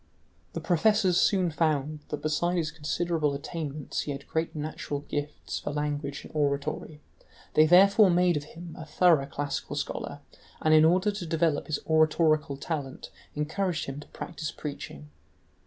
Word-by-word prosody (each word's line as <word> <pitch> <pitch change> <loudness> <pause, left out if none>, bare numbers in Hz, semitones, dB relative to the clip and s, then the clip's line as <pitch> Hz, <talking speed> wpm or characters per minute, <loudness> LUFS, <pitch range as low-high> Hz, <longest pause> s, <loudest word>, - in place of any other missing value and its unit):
The - - -4
professors 185 0 +3
soon 185 -6 +3
found 155 -1 0
that 150 - -4
besides 175 +4 +1
his 155 -3 -1
considerable 155 0 -1
attainments 150 -1 -5
he 145 - -4
had 140 0 -7
great 160 +1 -2
natural 150 -1 -4
gifts 145 0 -4
for - - -5
languages 145 -1 -3
and - - -13
oratory; 145 +1 -1 0.5
they 155 0 +6
therefore 195 +4 +7
made 180 0 +3
of 145 -1 -3
him 165 +2 -10
a - - -6
thorough 160 -3 +3
classical 145 0 -4
scholar, - - -4 0.4
and 155 - +3
in 155 0 +7
order 185 +5 +3
to 200 -3 -5
develop 160 -2 +1
his 155 - 0
oratorical 155 -2 +3
talent 140 -2 -5 0.2
encouraged 160 +3 -1
him 135 +1 -6
to 150 - -11
practise 160 -3 -6
preaching. 75 - -7
155 Hz, 155 wpm, -28 LUFS, 145-170 Hz, 0.5 s, therefore